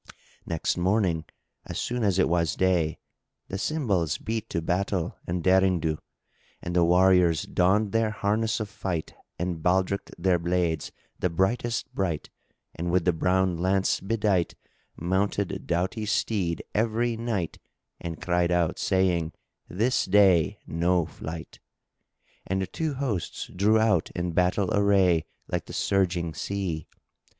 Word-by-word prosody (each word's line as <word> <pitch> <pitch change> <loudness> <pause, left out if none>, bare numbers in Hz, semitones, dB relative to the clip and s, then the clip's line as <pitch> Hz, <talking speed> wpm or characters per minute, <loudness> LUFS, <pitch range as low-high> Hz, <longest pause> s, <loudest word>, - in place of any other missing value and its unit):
Next 85 +1 -1
morning, 90 -3 +1 0.4
as - - -6
soon 120 -1 -2
as 100 -3 +2
it 95 - +4
was 85 -1 +1
day, 85 -4 +1 0.5
the 95 - -3
cymbals 100 - 0
beat 110 0 -4
to - - -1
battle 90 +1 -1
and 85 -1 -2
derring 95 -1 +4
do, 80 -1 -1 0.6
and 85 0 -5
the 85 - +5
warriors 90 -1 +4
donned 100 +3 +2
their 115 0 +2
harness 110 +2 0
of 110 - -3
fight 90 -5 -4 0.2
and 90 -2 -3
baldrick'd[FN#5] 95 +3 0
their 90 0 +2
blades 85 -2 0 0.3
the 90 - +1
brightest 115 +7 -1
bright 85 -6 -2 0.4
and 85 +1 -3
with 90 -1 +2
the 90 - +3
brown 90 +1 +1
lance 95 +2 +2
bedight 100 -4 0 0.4
mounted 95 +2 -1
doughty 95 +5 -1
steed 95 -6 0
every 115 +2 +1
knight 110 -7 -3 0.4
and 85 -1 -6
cried 90 -1 +2
out, 85 -2 +1
saying, 90 -4 +1 0.4
"This 115 +8 +1
day 95 -5 +4
no 85 +1 +1
flight!" 80 0 -8 0.9
And 95 +1 0
the 95 - 0
two 150 - -3
hosts 120 - -3
drew 105 +4 +4
out 110 -1 +2
in 90 0 -1
battle 90 +4 +1
array, 95 -5 +3 0.2
like - - -3
the - - -8
surging 90 -4 0
sea. 90 -1 -3
95 Hz, 140 wpm, -26 LUFS, 85-100 Hz, 0.9 s, the